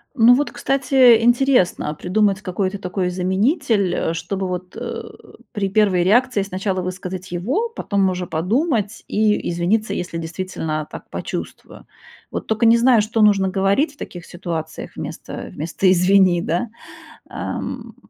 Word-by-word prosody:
Ну 235 -1 +7
вот, 285 +4 +1
кстати, 260 -3 +4
интересно, 240 - +3
а - - -3
придумать 195 +4 0
какой-то 190 +1 -2
такой 185 -1 -2
заменитель, 200 - +1
э, 165 - -1
чтобы 185 +4 -3
вот, 180 0 -5
э, - - -5 0.5
при 200 -4 -2
первой 195 -3 +3
реакции 240 +3 +3
сначала 190 0 -2
высказать 185 0 -6
его, 255 - -1
потом 200 - 0
уже 180 -1 -3
подумать 210 - -1
и 210 0 +1
извиниться, 180 +6 0
если 175 -1 -4
действительно 160 -2 -4
так - - -10
почувствую. - - -7 0.5
Вот - - -5
только 220 +1 +1
не 230 +1 +6
знаю, 235 -1 +5
что 220 +1 -1
нужно 200 -2 +4
говорить 200 - +1
в - - -24
таких 175 - -8
ситуациях 165 -3 -6
вместо - - -7
вместо 170 +5 0
"извини", 185 -1 +4
да? 175 +8 -1 0.6
Эм, - - -5
195 Hz, 145 wpm, -20 LUFS, 180-225 Hz, 0.6 s, Ну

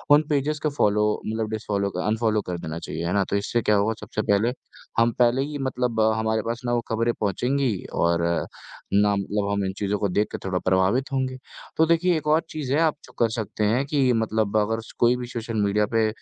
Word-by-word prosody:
उन 150 - +5
पेजेज़ 150 +1 0
को 155 - +2
फ़ॉलो 105 -7 +2 0.2
मतलब 110 0 -2
डिस 110 0 -4
फ़ॉलो 100 -1 0 0.2
अनफ़ॉलो 110 0 +1
कर 90 -1 -3
देना 80 +1 -5
चाहिए, 80 +1 -5
है 85 - -1
ना? 100 -1 +3
तो - - 0
इससे 100 +4 0
क्या 105 - +3
होगा 105 +2 +2
सबसे 110 - -3
पहले 110 +4 +3 0.5
हम 115 +1 +4
पहले 125 +2 +4
ही 150 0 -5
मतलब 125 -3 -1 0.2
हमारे 110 0 0
पास 115 +1 -3
ना 120 - 0
वो 120 - +1
खबरें 115 +1 +1
पहुँचेंगी 125 +5 +1 0.2
और 85 0 +1 0.7
ना 100 0 +4
मतलब 100 +1 -1
हम 100 -1 0
इन 95 - -2
चीज़ों 105 0 -1
को 100 - +1
देख 105 +4 +1
के - - -3
थोड़ा 90 -1 0
प्रभावित 95 +9 +2
होंगे। 130 -1 -1 0.4
तो 160 - +5
देखिए 170 +1 +3
एक 150 - -5
और 155 +2 +4
चीज़ 150 -5 -3
है 150 - +3
आप 155 -2 +2
जो - - -18
कर 115 -1 +3
सकते 110 -1 -3
हैं 120 +6 +2
कि 140 -3 +2
मतलब 110 -2 0
अगर 110 +2 +1
स 115 - -14
कोई 120 +1 +4
भी 125 - -5
सोशल 115 -1 -5
मीडिया 105 +1 +2
पे 110 -1 +3
110 Hz, 225 wpm, -24 LUFS, 100-125 Hz, 0.7 s, उन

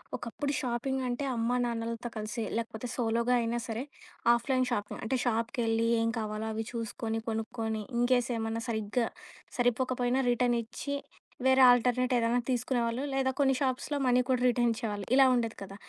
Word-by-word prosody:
ఒకప్పుడు 280 +4 -3
షాపింగ్ 260 +2 -1
అంటే 245 +3 -2
అమ్మా 235 +2 0
నాన్నలతో 230 0 -3
కలిసి 215 +2 -3
లేకపోతే, 230 +1 -4
సోలోగా 235 +1 +1
అయినా 230 +1 -1
సరే 230 +3 -3 0.5
ఆఫ్‌లైన్ 255 +2 +1
షాపింగ్. 205 -3 -2
అంటే, 235 +4 0
షాప్‌కెళ్లి 230 -1 0
ఏం 225 0 +1
కావాలో 215 0 -3
అవి 220 +1 -3
చూసుకొని 225 -1 -3
కొనుక్కొని 225 0 -2 0.2
ఇన్‌కేస్ 245 0 +2
ఏమన్నా 225 0 -2
సరిగ్గా 220 +1 0 0.5
సరిపోకపోయినా 245 +1 +1
రిటర్న్ 240 0 +2
ఇచ్చి 280 +5 -5 0.5
వేరే 265 0 +5
ఆల్టర్నేట్ 250 +1 +3
ఏదైనా 235 +1 +2
తీసుకునేవాళ్ళు. 245 -1 0
లేదా 265 -1 +1
కొన్ని 270 -1 +4
షాప్స్‌లో 265 +2 -1
మనీ 250 0 +4
కూడా 255 -1 +1
రిటర్న్ 240 -1 +2
ఇచ్చేవాళ్ళు. 210 -4 -4
ఇలా 270 - +7
ఉండేది 230 -2 0
కదా! 195 0 -8
235 Hz, 145 wpm, -30 LUFS, 225-250 Hz, 0.5 s, ఇలా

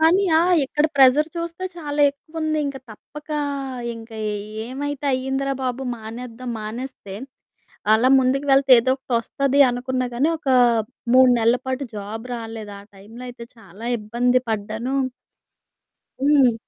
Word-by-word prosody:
కానీ 350 +5 +4
ఆ! - - +4 0.2
ఇక్కడ 295 +3 +1
ప్రెజర్ 275 +4 +6
చూస్తే, 335 +2 -4
చాలా 295 -3 -3
ఎక్కువుంది. 310 +2 -4
ఇంక 275 - -4
తప్పకా 300 +7 -7 0.6
ఇంక 225 0 -11 0.2
ఏ - - -2 0.3
ఏమైతే 285 +2 -5
అయిందిరా 265 +1 -1
బాబు, 255 +1 -2
మానేద్దాం, 235 +2 -8
మానేస్తే 220 -2 -7 0.8
అలా 230 +4 +4
ముందుకు 265 +2 +1
వెళ్తే 270 0 +4
ఏదోకటొస్తది 260 +2 0
అనుకున్నా 255 +1 -2
గానీ. 275 +7 +2
ఒక 280 - -6 0.7
3 255 0 +7
నెల్ల 230 +2 +3
పాటు 260 +1 -2
జాబ్ 210 +3 -6
రాలేదు. 225 -2 -7
ఆ - - -13
టైంలో 210 +5 -12
అయితే 245 -1 -9
చాలా 205 +1 -13
ఇబ్బంది 240 +4 +1
పడ్డానూ 220 +4 -3 1.3
హ్మ్. 275 -4 +5
255 Hz, 125 wpm, -22 LUFS, 230-280 Hz, 1.3 s, 3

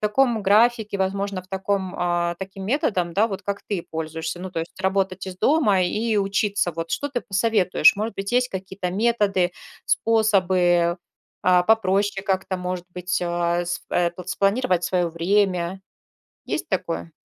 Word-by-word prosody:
таком 225 +2 +2
графике, 215 +1 +3
возможно 195 0 -2
в 185 - -24
таком, 190 -1 -2
а, 175 -1 0
таким 190 0 -7
методом, 195 - 0
да, 210 +3 +4
вот 200 -2 -6
как 200 0 -4
ты 195 -5 -2
пользуешься. 160 +1 -4
Ну, 185 +1 -6
то 165 - -2
есть 170 +3 -8
работать 190 -1 0
из 185 -1 -7
дома 210 -9 +3
и 215 +4 0
учиться, 200 -1 +1
вот, 165 +1 -5
что 285 - -1
ты 250 -3 -2
посоветуешь? 195 -2 +3
Может 215 +1 -3
быть, 195 +2 -4
есть 250 +1 +2
какие-то 190 -1 -5
методы, 205 -4 +1 0.4
способы, 185 -6 +2 0.4
а, 180 -1 +4
попроще 200 -1 +2
как-то, 190 -1 -1
может 180 0 -4
быть 180 0 -2
а, 175 0 0
с 175 0 -3
в, - - -10
э, 175 -1 +2
спланировать 195 -1 +1
своё 180 -2 +1
время? 180 +1 0 0.7
Есть - - -3
такое? 85 0 -3
190 Hz, 155 wpm, -23 LUFS, 175-205 Hz, 0.7 s, да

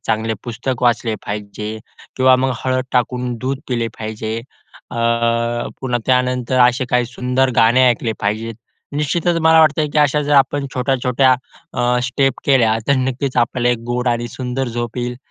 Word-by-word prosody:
चांगले 110 0 0
पुस्तक 120 +1 -4
वाचले 120 -2 +2
पाहिजे 105 +1 -5 0.4
किंवा 130 0 +5
मग 130 0 0
हळद 130 0 0
टाकून 125 0 0
दूध 130 +1 -2
पिले 120 -2 -1
पाहिजे. 110 0 -4 0.6
अ - - -5 0.8
पुन्हा 125 -2 -1
त्यानंतर 125 0 +1
असे 125 +2 -1
काही 125 0 +2
सुंदर 125 +2 0
गाणे 120 +3 +5
ऐकले 115 -1 0
पाहिजे. 110 +3 -2 0.4
निश्चितच 170 +4 0
मला 160 0 +6
वाटतं, 155 0 +3
की 150 - +1
अशा 150 0 +3
जर 145 0 -1
आपण 140 +1 +3
छोट्या-छोट्या 130 0 +2 0.4
अ, 125 0 +1
स्टेप 135 0 +1
केल्या 120 -5 +4
तर 140 - +5
नक्कीच 130 +1 -2
आपल्याला 120 +1 +1
एक 120 - 0
गोड 125 +1 0
आणि 120 0 -1
सुंदर 130 +2 -3
झोप 120 +1 -4
येईल. 120 0 -3
125 Hz, 155 wpm, -18 LUFS, 120-130 Hz, 0.8 s, मला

